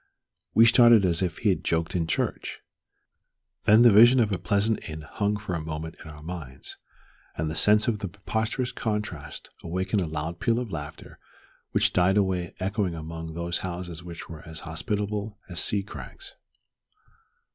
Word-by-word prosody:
we 115 Hz, +2 st, +8 dB
started 120 Hz, -3 st, +7 dB
as 85 Hz, -1 st, +2 dB
if 90 Hz, -2 st, -1 dB
he 110 Hz, -, +1 dB
had 95 Hz, -, +1 dB
joked 80 Hz, +1 st, -1 dB
in 85 Hz, -2 st, 0 dB
church. -, -, -2 dB, 1.0 s
Then 110 Hz, +3 st, +7 dB
the 120 Hz, -, +8 dB
vision 120 Hz, +5 st, +8 dB
of 110 Hz, -3 st, +2 dB
a 95 Hz, -, -1 dB
pleasant 100 Hz, -1 st, 0 dB
inn 80 Hz, 0 st, -6 dB
hung 105 Hz, +7 st, -1 dB
for 100 Hz, -3 st, -5 dB
a 85 Hz, -, -2 dB
moment 80 Hz, +1 st, -5 dB
in -, -, -10 dB
our 75 Hz, 0 st, -11 dB
minds, 80 Hz, -6 st, -6 dB, 0.6 s
and 80 Hz, 0 st, -1 dB
the -, -, -4 dB
sense 105 Hz, +6 st, +4 dB
of 110 Hz, -3 st, +1 dB
the 100 Hz, -, -3 dB
preposterous 110 Hz, +6 st, -2 dB
contrast 105 Hz, -9 st, -4 dB
awakened 95 Hz, +4 st, -1 dB
a 85 Hz, -, -1 dB
loud 80 Hz, +2 st, -4 dB
peal 115 Hz, +5 st, +2 dB
of 120 Hz, -4 st, -3 dB
laughter 75 Hz, -2 st, -8 dB, 0.5 s
which -, -, +2 dB
died 90 Hz, +3 st, +3 dB
away 95 Hz, -3 st, 0 dB
echoing 95 Hz, -2 st, -1 dB
among 80 Hz, 0 st, -7 dB
those 85 Hz, 0 st, 0 dB
houses 85 Hz, -2 st, -5 dB
which 85 Hz, -1 st, -8 dB
were 80 Hz, -3 st, -9 dB
as 80 Hz, 0 st, -7 dB
hospitable 105 Hz, +5 st, -3 dB
as 85 Hz, -3 st, -2 dB
sea 100 Hz, -1 st, +1 dB
crags. 100 Hz, -, -9 dB
90 Hz, 170 wpm, -26 LUFS, 80-105 Hz, 1.0 s, we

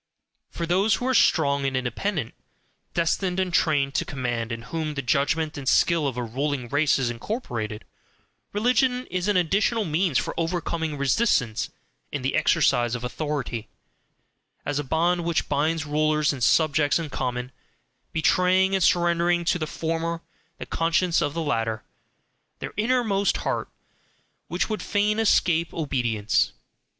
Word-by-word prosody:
For 170 Hz, -, -4 dB
those 190 Hz, +6 st, +3 dB
who 245 Hz, -, -4 dB
are 260 Hz, -, +1 dB
strong 140 Hz, -, +3 dB
and 135 Hz, -1 st, 0 dB
independent, 130 Hz, -, -2 dB, 0.6 s
destined 180 Hz, +2 st, 0 dB
and 185 Hz, -2 st, -1 dB
trained 145 Hz, -5 st, +2 dB
to -, -, +1 dB
command, 120 Hz, -6 st, -3 dB
in 115 Hz, 0 st, -5 dB
whom 155 Hz, +3 st, -4 dB
the 140 Hz, -, -3 dB
judgment 150 Hz, +5 st, 0 dB
and 135 Hz, -, -1 dB
skill 165 Hz, -4 st, +3 dB
of 130 Hz, -3 st, -4 dB
a 125 Hz, -, -1 dB
ruling 130 Hz, +1 st, -2 dB
race 145 Hz, +3 st, +3 dB
is 125 Hz, -3 st, 0 dB
incorporated, 115 Hz, -, -4 dB, 0.7 s
religion 250 Hz, +3 st, +1 dB
is 185 Hz, +1 st, -1 dB
an 205 Hz, -2 st, +3 dB
additional 200 Hz, +5 st, +1 dB
means 160 Hz, -2 st, +1 dB
for -, -, -1 dB
overcoming 165 Hz, -2 st, -2 dB
resistance 135 Hz, -, +1 dB, 0.4 s
in 140 Hz, -3 st, -4 dB
the 135 Hz, -, 0 dB
exercise 135 Hz, -6 st, +2 dB
of 125 Hz, -, -6 dB
authority 125 Hz, -4 st, -3 dB, 1.0 s
as 145 Hz, 0 st, -1 dB
a -, -, -2 dB
bond 170 Hz, +5 st, +1 dB
which 170 Hz, -1 st, 0 dB
binds 155 Hz, +2 st, 0 dB
rulers 150 Hz, 0 st, +1 dB
and 130 Hz, -3 st, -4 dB
subjects 145 Hz, +4 st, +3 dB
in 160 Hz, -3 st, -5 dB
common, 125 Hz, -1 st, -3 dB, 0.6 s
betraying 185 Hz, +4 st, +3 dB
and 190 Hz, -2 st, +2 dB
surrendering 175 Hz, 0 st, +2 dB
to 175 Hz, -, +1 dB
the 155 Hz, -, -2 dB
former 165 Hz, +1 st, -3 dB, 0.3 s
the -, -, -6 dB
conscience 170 Hz, +1 st, +1 dB
of 145 Hz, +1 st, -1 dB
the 165 Hz, -, -1 dB
latter, 115 Hz, -6 st, -1 dB, 0.7 s
their -, -, -7 dB
inmost 215 Hz, -3 st, +1 dB
heart, -, -, -1 dB, 0.8 s
which -, -, -1 dB
would 215 Hz, -1 st, -3 dB
fain 210 Hz, +1 st, +1 dB
escape 170 Hz, -6 st, +2 dB
obedience. 120 Hz, -8 st, 0 dB
155 Hz, 145 wpm, -25 LUFS, 135-180 Hz, 1.0 s, those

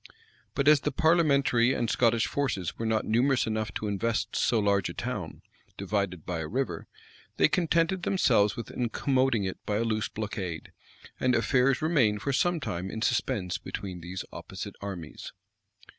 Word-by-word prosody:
But 140 Hz, -, 0 dB
as 150 Hz, -1 st, +7 dB
the 150 Hz, -, -2 dB
parliamentary 140 Hz, -7 st, +3 dB
and 120 Hz, -, 0 dB
Scottish 115 Hz, 0 st, +2 dB
forces 110 Hz, -11 st, -2 dB
were 115 Hz, -, -1 dB
not 110 Hz, -1 st, +1 dB
numerous 125 Hz, +4 st, +2 dB
enough 110 Hz, -1 st, -2 dB
to 110 Hz, -, -2 dB
invest 110 Hz, +3 st, -1 dB
so 120 Hz, -, +2 dB
large 100 Hz, -2 st, +2 dB
a -, -, -8 dB
town, -, -, -5 dB, 0.3 s
divided 100 Hz, -5 st, -2 dB
by 90 Hz, -2 st, -3 dB
a 80 Hz, -, -3 dB
river, 110 Hz, -6 st, -3 dB, 0.5 s
they -, -, +5 dB
contented 170 Hz, +1 st, +1 dB
themselves 110 Hz, -, +3 dB
with 115 Hz, -, -6 dB
incommoding 130 Hz, -1 st, +1 dB
it 95 Hz, -, -7 dB
by 105 Hz, -, -2 dB
a 115 Hz, -, +1 dB
loose 110 Hz, -2 st, -1 dB
blockade; 95 Hz, -6 st, -5 dB, 0.5 s
and 125 Hz, -1 st, +2 dB
affairs 125 Hz, +3 st, +2 dB
remained 120 Hz, -11 st, +2 dB
for 140 Hz, -, 0 dB
some 175 Hz, +5 st, +2 dB
time 90 Hz, -, -4 dB
in 110 Hz, +2 st, -4 dB
suspense 100 Hz, -6 st, 0 dB
between 95 Hz, -4 st, -6 dB
these 90 Hz, +3 st, -6 dB
opposite -, -, -7 dB
armies. 90 Hz, -6 st, -7 dB
115 Hz, 160 wpm, -28 LUFS, 100-135 Hz, 0.5 s, as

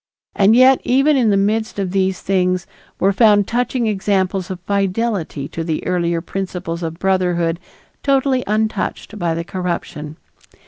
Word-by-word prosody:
And 205 Hz, +3 st, +5 dB
yet 260 Hz, +1 st, +6 dB
even 275 Hz, +4 st, +3 dB
in 245 Hz, -5 st, +3 dB
the 200 Hz, -, +3 dB
midst 215 Hz, +3 st, 0 dB
of 195 Hz, -3 st, -2 dB
these 190 Hz, -1 st, 0 dB
things 185 Hz, -2 st, 0 dB, 0.3 s
were 195 Hz, +1 st, +3 dB
found 205 Hz, -1 st, +4 dB
touching 245 Hz, 0 st, 0 dB
examples 195 Hz, -3 st, 0 dB
of 185 Hz, -2 st, -5 dB
fidelity 195 Hz, -6 st, -1 dB
to 165 Hz, -, -4 dB
the 160 Hz, -2 st, -3 dB
earlier 170 Hz, -2 st, 0 dB
principles 180 Hz, -2 st, -5 dB
of 165 Hz, -1 st, -4 dB
brotherhood 175 Hz, -3 st, 0 dB, 0.4 s
totally 270 Hz, -2 st, +1 dB
untouched 215 Hz, 0 st, -2 dB
by 170 Hz, -2 st, 0 dB
the 165 Hz, -, -3 dB
corruption. 170 Hz, -4 st, -5 dB
195 Hz, 145 wpm, -19 LUFS, 175-220 Hz, 0.4 s, yet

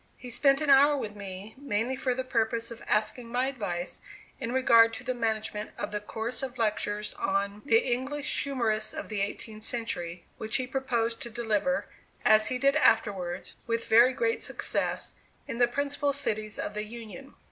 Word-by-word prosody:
He 250 Hz, -, -8 dB
spent 275 Hz, +3 st, +3 dB
an 295 Hz, -2 st, +3 dB
hour 285 Hz, +2 st, +7 dB
with 210 Hz, -6 st, -4 dB
me, 200 Hz, +1 st, -7 dB
mainly 250 Hz, -1 st, -1 dB
for 255 Hz, -1 st, 0 dB
the 260 Hz, -, -2 dB
purpose 230 Hz, -2 st, 0 dB
of 230 Hz, -, -9 dB
asking 215 Hz, +3 st, 0 dB
my 250 Hz, +2 st, +1 dB
advice 200 Hz, -10 st, -3 dB, 0.4 s
in 240 Hz, -3 st, -3 dB
regard 230 Hz, -3 st, +6 dB
to 250 Hz, -, -8 dB
the 255 Hz, 0 st, -1 dB
management 220 Hz, -3 st, -2 dB
of 205 Hz, -, -3 dB
the 210 Hz, -, -1 dB
course 220 Hz, +3 st, -5 dB
of 260 Hz, -2 st, -5 dB
lectures 210 Hz, -2 st, -1 dB
on 200 Hz, +1 st, 0 dB
"The 450 Hz, -, +5 dB, 0.2 s
English 280 Hz, +4 st, -2 dB
Humorists 230 Hz, -6 st, -1 dB
of -, -, -5 dB
the 210 Hz, -2 st, -1 dB
Eighteenth 215 Hz, +2 st, -4 dB
Century," 180 Hz, -8 st, -3 dB, 0.2 s
which 220 Hz, 0 st, -2 dB
he 260 Hz, -, +1 dB
proposed 240 Hz, -3 st, -1 dB
to 235 Hz, -, -5 dB
deliver, 235 Hz, +3 st, 0 dB, 0.4 s
as 215 Hz, 0 st, +6 dB
he 255 Hz, -, 0 dB
did 275 Hz, +2 st, +3 dB
afterwards, 200 Hz, -9 st, +1 dB
with 230 Hz, 0 st, -1 dB
very 235 Hz, +3 st, +7 dB
great 455 Hz, -, 0 dB
success, -, -, -2 dB, 0.3 s
in 230 Hz, -, -4 dB
the 245 Hz, -, +6 dB
principal 285 Hz, +2 st, -1 dB
cities 215 Hz, -6 st, -2 dB
of 205 Hz, -, -3 dB
the 210 Hz, 0 st, -2 dB
Union. 235 Hz, +4 st, -9 dB
230 Hz, 180 wpm, -29 LUFS, 215-260 Hz, 0.4 s, hour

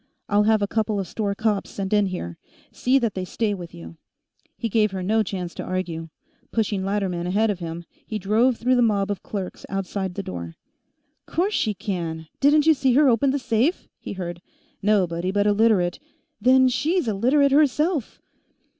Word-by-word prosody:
I'll 205 Hz, 0 st, +3 dB
have 215 Hz, -1 st, +3 dB
a -, -, +1 dB
couple 215 Hz, -1 st, 0 dB
of 190 Hz, -, -3 dB
store 200 Hz, +2 st, -2 dB
cops 215 Hz, -1 st, 0 dB
sent 195 Hz, 0 st, -4 dB
in 205 Hz, -1 st, +3 dB
here; 85 Hz, -, -5 dB, 0.3 s
see 255 Hz, +2 st, +2 dB
that 230 Hz, -6 st, 0 dB
they 185 Hz, -, -3 dB
stay 205 Hz, +3 st, -1 dB
with 175 Hz, -3 st, -7 dB
you." 170 Hz, -1 st, -11 dB, 0.6 s
He 230 Hz, -, -2 dB
gave 215 Hz, -1 st, +2 dB
her 190 Hz, -1 st, -5 dB
no 220 Hz, +4 st, +2 dB
chance 185 Hz, -4 st, -4 dB
to -, -, -6 dB
argue. 170 Hz, -3 st, -4 dB, 0.4 s
Pushing 210 Hz, -4 st, 0 dB
Latterman 190 Hz, -3 st, -1 dB
ahead 210 Hz, +4 st, +2 dB
of 190 Hz, -, -5 dB
him, 170 Hz, 0 st, -6 dB, 0.2 s
he 215 Hz, -, -3 dB
drove 220 Hz, +5 st, +2 dB
through 250 Hz, +1 st, +2 dB
the -, -, +4 dB
mob 205 Hz, -3 st, +2 dB
of 200 Hz, -, -4 dB
clerks 195 Hz, -3 st, -6 dB
outside 195 Hz, -1 st, -3 dB
the 200 Hz, -, -3 dB
door. 85 Hz, -, -6 dB, 0.4 s
"... -, -, -49 dB
Course 385 Hz, +5 st, +2 dB
she 215 Hz, -, 0 dB
can; 165 Hz, -5 st, -4 dB
didn't 295 Hz, +2 st, +4 dB
you 320 Hz, -, +7 dB
see 265 Hz, -3 st, +1 dB
her 290 Hz, +3 st, +5 dB
open 240 Hz, +3 st, +3 dB
the 275 Hz, -, +1 dB
safe?" 255 Hz, -, 0 dB
he -, -, -6 dB
heard. 175 Hz, -2 st, -6 dB, 0.2 s
"... -, -, -39 dB
Nobody 180 Hz, -3 st, +1 dB
but 205 Hz, +1 st, +1 dB
a 210 Hz, -, +4 dB
Literate 205 Hz, -5 st, +2 dB, 0.2 s
" -, -, -50 dB
"Then 260 Hz, +1 st, +5 dB
she's 310 Hz, +5 st, 0 dB
a 220 Hz, -, +1 dB
Literate, 270 Hz, +7 st, +3 dB
herself!" 300 Hz, -, +2 dB
205 Hz, 200 wpm, -23 LUFS, 185-240 Hz, 0.6 s, you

